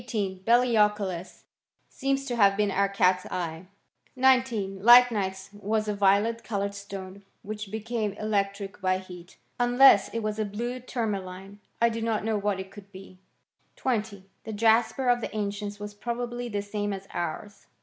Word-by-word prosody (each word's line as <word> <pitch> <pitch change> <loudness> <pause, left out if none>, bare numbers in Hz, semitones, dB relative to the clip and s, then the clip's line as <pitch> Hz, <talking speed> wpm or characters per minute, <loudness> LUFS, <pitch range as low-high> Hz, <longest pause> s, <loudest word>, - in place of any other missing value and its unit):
Belioculus 210 -3 0 0.4
seems 275 0 -2
to 245 -3 -3
have 200 -3 +4
been 210 -1 +1
our 200 +1 +1
catseye.. 180 -3 0 0.5
19. 255 -7 +2
Lychnites 210 -4 +5
was 215 +1 -2
a 210 - 0
violet 205 +3 +2
coloured 200 -2 -2
stone, 200 -1 -8 0.2
wkirfl 210 0 -6
became 220 -1 -3
electric 200 -1 -2
by 185 0 +2
heat. 180 -2 -12 0.2
Unless 245 -4 +6
it 230 -1 -3
was 215 0 -2
a - - +2
bhie 240 +5 -5
lim^' 235 -3 -2
maliny 190 0 -7 0.3
1 235 - +5
do 230 0 -4
not 225 -2 -1
know 225 -1 0
what 200 -1 -1
it 190 0 -7
could 200 -1 -13
be.. 190 -1 -13 0.5
•: - - -43
20. 210 -6 -3 0.2
The 220 - -6
jasper 230 +4 +2
of 245 0 +3
the - - -5
ancients 205 0 -4
was 205 0 -7
probably 240 +2 -4
As 205 0 -4
same 205 -1 -2
as 195 0 -8
ours. 195 +4 -5
205 Hz, 160 wpm, -27 LUFS, 195-230 Hz, 0.5 s, Unless